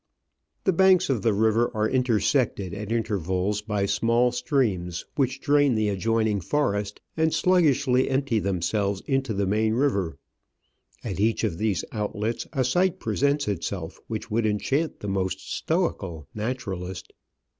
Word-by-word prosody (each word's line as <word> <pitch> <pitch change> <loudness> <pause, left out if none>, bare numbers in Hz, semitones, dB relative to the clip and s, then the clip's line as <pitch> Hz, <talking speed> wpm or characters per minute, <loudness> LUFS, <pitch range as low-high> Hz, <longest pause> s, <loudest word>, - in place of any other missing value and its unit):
The 190 - +2
banks 185 -2 +4
of 120 -6 0
the 115 - +2
river 110 +3 +2
are 110 0 +2
intersected 120 -5 +1
at 105 +1 -5
intervals 100 -2 -1
by 105 -2 -1
small 115 +5 +2
streams, 115 - -1
which 135 -1 0
drain 145 -2 +3
the 110 -1 +1
adjoining 110 +1 0
forest 105 - -1 0.2
and 160 0 +2
sluggishly 150 -6 +3
empty 135 -4 +1
themselves 100 +1 -1
into 135 -3 0
the 100 -1 0
main 110 +3 +1
river. 100 - 0 0.9
At - - -4
each 110 +3 +1
of 95 -7 -1
these 105 -6 0
outlets 105 +1 -3
a 135 -4 0
sight 175 +8 +2
presents 140 +6 0
itself 90 -3 -4
which 110 0 -5
would 110 0 +1
enchant 135 +9 -1
the 105 - -5
most 95 -1 -1
stoical 95 - -2
naturalist. 100 -6 -5
110 Hz, 140 wpm, -25 LUFS, 100-130 Hz, 0.9 s, banks